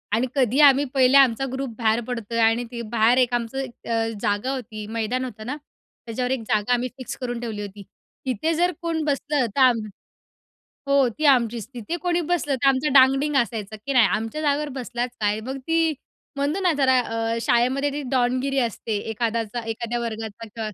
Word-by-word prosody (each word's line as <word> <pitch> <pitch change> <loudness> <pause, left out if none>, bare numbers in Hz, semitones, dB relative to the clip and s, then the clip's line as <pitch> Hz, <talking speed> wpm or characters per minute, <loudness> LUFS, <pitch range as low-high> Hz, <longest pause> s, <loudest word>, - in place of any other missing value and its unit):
आणि 250 +3 +1
कधी 260 +1 +2
आम्ही 280 0 +6
पहिले 265 0 +5
आमचा 270 -1 +4
ग्रुप 265 -1 -3
बाहेर 225 0 +2
पडतोय. 230 -2 -3
आणि 225 +2 +3
ते 235 -1 -5
बाहेर 230 +2 +4
एक 250 -1 +2
आमचं 240 +2 -2
एक 255 -3 -7
अ, 225 0 +1
जागा 205 +6 0
होती, 220 -5 -6
मैदान 230 +3 -2
होतं 220 -3 -8
ना, 260 +4 -3 0.5
त्याच्यावर 250 +2 -2
एक 260 -3 -1
जागा 215 +3 +1
आम्ही 245 +1 0
फिक्स 255 - -6
करून 245 -2 -4
ठेवली 220 -3 -5
होती. 200 0 -8 0.4
तिथे 265 +6 0
जर 350 +2 +2
कोण 330 -2 -1
बसलं, 285 -2 0
तर - - 0
आम 245 -3 +5 1.1
हो, 275 -2 +4
ती 310 - -2
आमचीच. 235 -2 -2
तिथे 245 +9 -4
कोणी 350 -1 +1
बसलं 300 -5 0
तर - - +3
आमचा 270 +3 +2
डांगडिंग 270 +2 +5
असायचा, 220 -3 -1
की 275 - -1
नाही 250 -3 +6
आमच्या 225 +8 -2
जागेवर 295 0 +1
बसलाच 245 0 -3
काय? 210 +1 +1
मग 265 +4 -5
ती 325 -1 +2 0.4
म्हणतो 290 +7 -1
ना 360 -3 +3
जरा 260 -2 +4
अ, 225 -1 -2
शाळेमध्ये 260 +5 +2
ती 290 0 -4
डॉनगिरी 255 +2 +1
असते, 230 -2 -1
एखाद्याचा 230 0 -2
एखाद्या 235 +1 -3
वर्गासकट. 225 -1 -6
245 Hz, 180 wpm, -23 LUFS, 225-275 Hz, 1.1 s, आम्ही